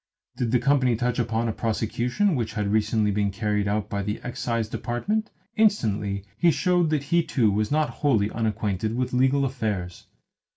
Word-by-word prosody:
Did 120 Hz, -, -1 dB
the 125 Hz, -, +3 dB
company 130 Hz, -1 st, +2 dB
touch 125 Hz, +1 st, -1 dB
upon 115 Hz, 0 st, 0 dB
a 110 Hz, -, -1 dB
prosecution 120 Hz, -, 0 dB
which 115 Hz, -4 st, -2 dB
had 105 Hz, -2 st, -1 dB
recently 110 Hz, 0 st, +2 dB
been 100 Hz, 0 st, +1 dB
carried 105 Hz, 0 st, -1 dB
out 105 Hz, 0 st, -1 dB
by 100 Hz, -1 st, -3 dB
the 105 Hz, +1 st, -3 dB
Excise 115 Hz, -2 st, -2 dB
Department, 195 Hz, -, -2 dB, 0.3 s
instantly 105 Hz, -, +1 dB
he 175 Hz, -, +5 dB
showed 175 Hz, 0 st, +2 dB
that 150 Hz, -3 st, 0 dB
he 170 Hz, +4 st, +2 dB
too 120 Hz, -9 st, +1 dB
was 105 Hz, +1 st, 0 dB
not 155 Hz, +1 st, +1 dB
wholly 110 Hz, -8 st, +2 dB
unacquainted 110 Hz, -1 st, -1 dB
with 125 Hz, 0 st, -2 dB
legal 135 Hz, +2 st, +3 dB
affairs. 105 Hz, -9 st, -3 dB
115 Hz, 170 wpm, -25 LUFS, 105-135 Hz, 0.3 s, he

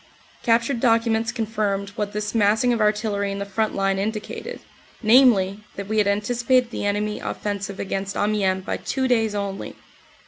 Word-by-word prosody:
Captured 235 Hz, +2 st, +2 dB
documents 230 Hz, -1 st, +2 dB
confirmed 210 Hz, -4 st, -2 dB
what 205 Hz, 0 st, -3 dB
this 210 Hz, 0 st, -3 dB
massing 225 Hz, +3 st, +3 dB
of 230 Hz, -, -1 dB
artillery 210 Hz, -1 st, +1 dB
in 195 Hz, -, -4 dB
the 200 Hz, -, -3 dB
front 215 Hz, +2 st, -1 dB
line 195 Hz, 0 st, +1 dB
indicated, 215 Hz, +1 st, -4 dB, 0.4 s
namely, 215 Hz, -5 st, +5 dB, 0.2 s
that 200 Hz, -1 st, -6 dB
we 220 Hz, +1 st, +1 dB
had 205 Hz, -, +3 dB
anticipated 240 Hz, +4 st, +1 dB
the 205 Hz, -, -2 dB
enemy 210 Hz, +1 st, -1 dB
offensive 200 Hz, -1 st, -4 dB
against 195 Hz, 0 st, -3 dB
Amiens 195 Hz, -3 st, 0 dB
by -, -, -2 dB
two 260 Hz, -1 st, -1 dB
days 225 Hz, -4 st, +1 dB
only. 200 Hz, -1 st, -4 dB
210 Hz, 160 wpm, -23 LUFS, 200-230 Hz, 0.4 s, namely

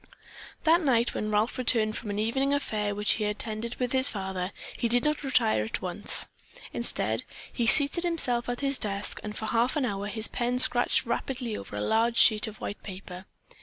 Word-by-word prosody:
That 335 Hz, +2 st, +4 dB
night, 240 Hz, -6 st, +1 dB
when 215 Hz, -, -3 dB
Ralph 215 Hz, +4 st, 0 dB
returned 225 Hz, -3 st, +1 dB
from 220 Hz, -, -6 dB
an 205 Hz, -, -3 dB
evening 265 Hz, +6 st, +1 dB
affair 210 Hz, -7 st, -2 dB
which 210 Hz, +1 st, +2 dB
he 215 Hz, -, 0 dB
had 210 Hz, 0 st, -1 dB
attended 220 Hz, +2 st, -3 dB
with 250 Hz, -1 st, -3 dB
his 260 Hz, +1 st, +2 dB
father, 190 Hz, -3 st, -4 dB, 0.2 s
he 235 Hz, -, 0 dB
did 245 Hz, +1 st, +3 dB
not 300 Hz, 0 st, 0 dB
retire 110 Hz, -, +2 dB
at 110 Hz, -, -4 dB
once. -, -, +4 dB, 0.5 s
Instead, 110 Hz, +3 st, -1 dB, 0.3 s
he 235 Hz, -, -1 dB
seated 285 Hz, +7 st, +5 dB
himself 260 Hz, -8 st, +2 dB
at 245 Hz, +2 st, -4 dB
his 275 Hz, -1 st, 0 dB
desk 200 Hz, -1 st, -2 dB
and 210 Hz, 0 st, -6 dB
for 220 Hz, -, -5 dB
half 235 Hz, +4 st, +1 dB
an 290 Hz, -4 st, 0 dB
hour 200 Hz, -3 st, -3 dB
his 220 Hz, +1 st, -2 dB
pen 245 Hz, +1 st, -2 dB
scratched 245 Hz, -1 st, +2 dB
rapidly 240 Hz, -1 st, -3 dB
over 100 Hz, -, -8 dB
a 105 Hz, -, -3 dB
large 230 Hz, -, +1 dB
sheet 215 Hz, 0 st, +5 dB
of 215 Hz, -1 st, -9 dB
white 205 Hz, -, -6 dB
paper. 185 Hz, -1 st, -9 dB
230 Hz, 200 wpm, -27 LUFS, 210-250 Hz, 0.5 s, seated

